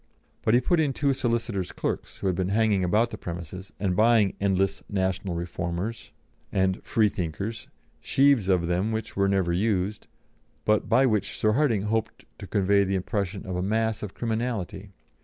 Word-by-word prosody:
But 110 - +3
he 125 - +4
put 170 +7 +2
in 145 -4 +2
two 140 +1 +1
solicitor's 115 -6 -1
clerks, - - -4
who - - -7
had 95 -2 +2
been 95 0 -1
hanging 105 -2 +2
about 110 +6 +2
the - - -7
premises, 90 +2 -7
and 95 -2 0
buying 110 -1 +4
endless 95 -1 +1
National 95 -2 -1
Reformers 85 +5 -4 0.4
and 95 -1 +1
Freethinkers, 100 0 -1 0.3
sheaves 135 -8 +3
of 90 -3 +3
them 90 +5 0
which 110 0 -4
were 100 0 +2
never 95 -3 +1
used, 100 +1 0 0.6
but 105 0 +2
by 130 +4 +5
which 105 -5 0
Sir 110 - +2
Hardinge 115 -5 +2
hoped 110 +1 -2
to - - -8
convey 100 0 +3
the 95 0 -1
impression 100 +1 -2
of 95 -2 -4
a 90 - -1
mass 110 +2 0
of 105 -3 -6
criminality. 110 -4 -3
100 Hz, 170 wpm, -26 LUFS, 95-110 Hz, 0.6 s, by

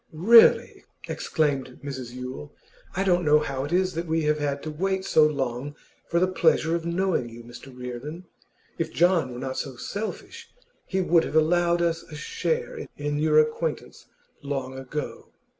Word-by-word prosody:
'Really,' 220 +9 +6 0.2
exclaimed 140 -5 -1
Mrs 130 -4 -6
Yule, 125 - -7 0.4
'I 190 - +1
don't 180 -2 +2
know 150 -1 +5
how 140 -3 -2
it 145 - -7
is 185 +1 +2
that 165 +1 -4
we 160 0 0
have 150 0 +1
had 140 -1 -2
to 155 - -4
wait 190 +4 -1
so 155 - +5
long 135 -1 -3 0.3
for 170 - +1
the 185 - +4
pleasure 165 -2 +2
of 170 0 -3
knowing 170 -8 0
you, 115 +1 -11
Mr 120 +3 -12
Reardon. 125 +7 -7 0.5
If 165 -1 -1
John 170 -6 +2
were 120 - -7
not 130 0 -4
so 135 -2 -5
selfish 200 - -6 0.4
he 190 0 0
would 170 -2 +4
have - - -5
allowed 170 +2 +3
us 165 -1 0
a 155 - -12
share 470 - -3
in 145 0 -2
your 155 0 +3
acquaintance 155 +1 0 0.3
long 135 -2 -4
ago. 135 +3 -6
155 Hz, 170 wpm, -25 LUFS, 135-175 Hz, 0.5 s, Really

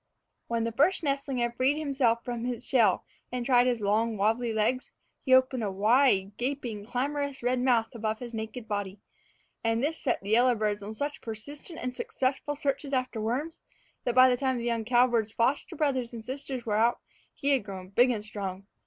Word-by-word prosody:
When 230 -1 0
the 230 - -1
first 300 - +2
nestling 275 -2 -1
had 240 -1 0
freed 265 +4 +2
himself 265 -6 +1
from 240 -2 -3
his 245 0 -4
shell 225 -8 +3 0.3
and 250 -1 -3
tried 245 -1 +4
his 240 -3 0
long, 215 +2 +1
wabbly 225 +4 +1
legs, 220 +4 0 0.3
he 260 - -2
opened 260 -2 +4
a 205 - 0
wide 205 -1 +3
gaping, 240 -5 -3
clamorous 280 +2 -2
red 250 +1 +1
mouth 245 -3 +2
above 220 -1 -2
his 240 0 -8
naked 220 +2 -5
little - - -26
body; 205 -1 -3 0.6
and 230 +1 +1
this 320 +3 -1
set 250 - 0
the 200 - -4
yellowbirds 220 -3 +3
on 210 +2 -7
such 285 +4 -3
persistent 285 +9 -7
and 250 0 -4
successful 270 +4 -2
searches 280 0 -2
after 255 -4 -1
worms, 265 +9 -2 0.4
that 245 - -1
by 255 0 +8
the 250 -1 +2
time 260 -1 0
the 235 - -4
young 230 -2 -1
cowbird's 240 -2 +3
foster 250 +5 0
brothers 260 -5 0
and 225 -1 -7
sisters 265 -2 -5
were 210 -2 0
out, 230 +2 +3 0.4
he 280 - -1
had 275 -5 +3
grown 190 -2 -8
big 240 +6 +4
and 215 -4 -2
strong. 195 -2 -5
240 Hz, 195 wpm, -28 LUFS, 220-260 Hz, 0.6 s, by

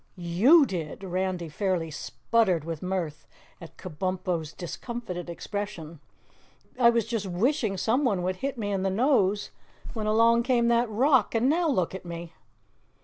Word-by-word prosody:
"YOU 205 - +5
did." 175 - -5
Randy 185 -2 -2
fairly 170 0 -2
sputtered 185 +2 0
with 165 -1 -5
mirth 180 -5 -3 0.3
at 165 - -12
Kabumpo's 180 -1 -3
discomfited 180 -1 -6
expression. 170 -3 -6 0.8
"I 235 -2 +7
was 235 -2 +1
just 225 -4 -3
wishing 215 +3 0
someone 225 -3 +1
would 185 +1 -1
hit 275 +5 -3
me 205 -3 -3
in 195 -1 -1
the 195 - +1
nose, 205 -2 +2 0.4
when 215 -2 -3
along 230 +2 +4
came 235 -1 +2
that 235 0 +2
rock 250 +1 +3
and 230 +3 +2
NOW 330 +3 +2
look 185 - 0
at 190 - -7
me!" 170 -1 -7
195 Hz, 145 wpm, -27 LUFS, 175-235 Hz, 0.8 s, I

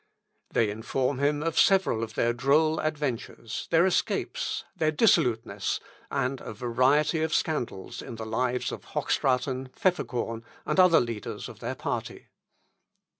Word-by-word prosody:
They 110 -3 +2
inform 125 +5 -1
him 145 +1 +1
of 165 -1 0
several 190 - +4
of 115 - -6
their 120 0 +2
droll 150 +6 +3
adventures, 140 -7 -3
their 165 +1 +5
escapes, 190 - -1
their 160 -4 +1
dissoluteness, 150 - +2 0.3
and 135 -1 -1
a - - -7
variety 130 +7 +2
of 160 0 +1
scandals 120 -11 -2
in 120 - -8
the 110 0 -6
lives 125 +3 -1
of - - -7
Hochstraten, 130 0 0
Pfefferkorn, 120 -10 -1 0.2
and - - 0
other 180 -3 +7
leaders 115 -3 -4
of - - -11
their - - -4
party. - - -4
130 Hz, 135 wpm, -27 LUFS, 120-155 Hz, 0.3 s, other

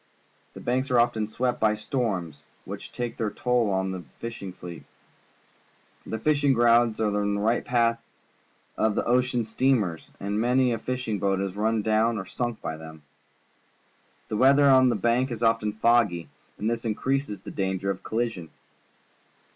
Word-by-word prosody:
The - - -8
Banks 130 +3 -1
are 125 -2 +4
often 120 -3 +1
swept 125 +3 -1
by 110 -1 +3
storms, 100 - -3 0.2
which - - -8
take 120 -1 -4
tlieir 110 -3 -2
toll 125 -4 +1
of 95 0 0
the 95 -1 -5 0.2
fishing 115 -5 -6
fleet. 90 -2 -10 1.2
The 110 - -3
fishing 145 0 +2
grounds 120 -2 +4
are 110 -2 +1
right 105 0 0 0.4
in - - -13
the - - -16
path 115 -1 +2 0.8
of 110 -1 +1
the - - 0
ocean 125 0 +2
steamers, 110 -7 0
and 100 +2 -2
many 125 +1 +3
a 115 - -3
fish 125 +1 -4
ing 105 -3 -1
boat 95 0 +1
is 100 -1 -3
run 110 +1 0
down 110 +1 +2
and 95 -2 -5
sunk 120 +2 -3
by 80 - -4
them. 80 -1 -11 1.3
The 105 - -2
weather 140 +4 +5
on 130 -1 +6
the - - +1
Banks 120 +2 +1
is 115 0 -5
often 115 -2 +2
foggy, 110 -6 +2 0.3
and 105 - -2
this 115 0 -1
increases 130 +1 -2
the - - -7
danger 95 0 -1
of 95 - -6
colli 120 +2 -1
sion. 90 -7 -10
115 Hz, 170 wpm, -26 LUFS, 100-125 Hz, 1.3 s, on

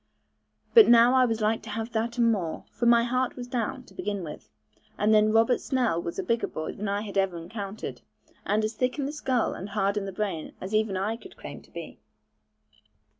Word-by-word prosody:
But 450 -3 +9
now 240 +1 +7
I 260 -1 +5
was 225 -2 -1
like 215 +1 +1
to 220 - -10
have 225 +2 -4
that 230 +1 -2
and 235 -1 +4
more; 175 -7 -3
for 235 - -1
my 235 0 +6
heart 255 +1 0
was 245 - -6
down, 250 +1 -3
to 195 - -18
begin 200 0 -3
with; 150 -2 -9 0.5
and 210 +1 +3
then 215 0 +5
Robert 225 +2 +3
Snell 245 - 0
was 170 - -5
a - - -1
bigger 230 0 0
boy 155 - -5
than 210 - -5
I 200 +1 -1
had 200 -2 -2
ever 190 -3 0
encountered, 200 +4 -6 0.4
and 210 +2 +1
as 215 - -3
thick 250 +4 -1
in 280 - -1
the 280 - -2
skull 265 -5 0
and 195 - -7
hard 200 0 0
in 200 - -1
the 195 - -4
brain 185 -5 -3
as 190 +3 -6
even 215 -3 +1
I 210 +4 -1
could - - -14
claim - - -9
to - - -21
be. - - -9
220 Hz, 225 wpm, -27 LUFS, 200-240 Hz, 0.5 s, But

